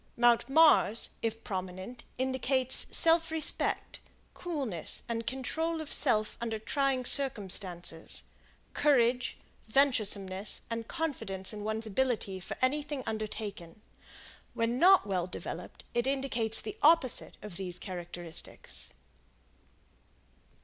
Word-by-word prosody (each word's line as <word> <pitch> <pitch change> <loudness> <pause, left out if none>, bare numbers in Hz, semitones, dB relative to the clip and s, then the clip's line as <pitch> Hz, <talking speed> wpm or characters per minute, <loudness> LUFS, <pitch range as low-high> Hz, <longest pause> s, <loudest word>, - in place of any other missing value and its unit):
Mount 240 +1 +3
Mars, 285 -7 +4
if 225 0 -3
prominent, 185 +5 -6
indicates 260 0 +3
self 330 0 +3
respect, 320 -1 +1 0.3
coolness, 275 - -1
and 230 -1 -4
control 320 +6 -1
of 310 -2 -7
self 215 -6 +1
under 225 -2 -2
trying 265 +3 -1
circumstances, 185 -10 +1 0.5
courage, 250 -4 +2 0.3
venturesomeness 210 -6 +1
and 230 0 -4
confidence 225 - -3
in 210 -1 -7
one's 220 +1 -3
ability 220 -3 -1
for 180 - -7
anything 290 0 0
undertaken. 215 -5 -5 0.8
When 230 +2 0
not 380 +4 +6
well 185 -3 -1
developed, - - -8
it 240 +2 0
indicates 260 -5 0
the 425 +1 -7
opposite 305 -5 +3
of 210 -4 -8
these 180 -2 -2
characteristics. 175 -2 -3
230 Hz, 105 wpm, -30 LUFS, 200-275 Hz, 0.8 s, not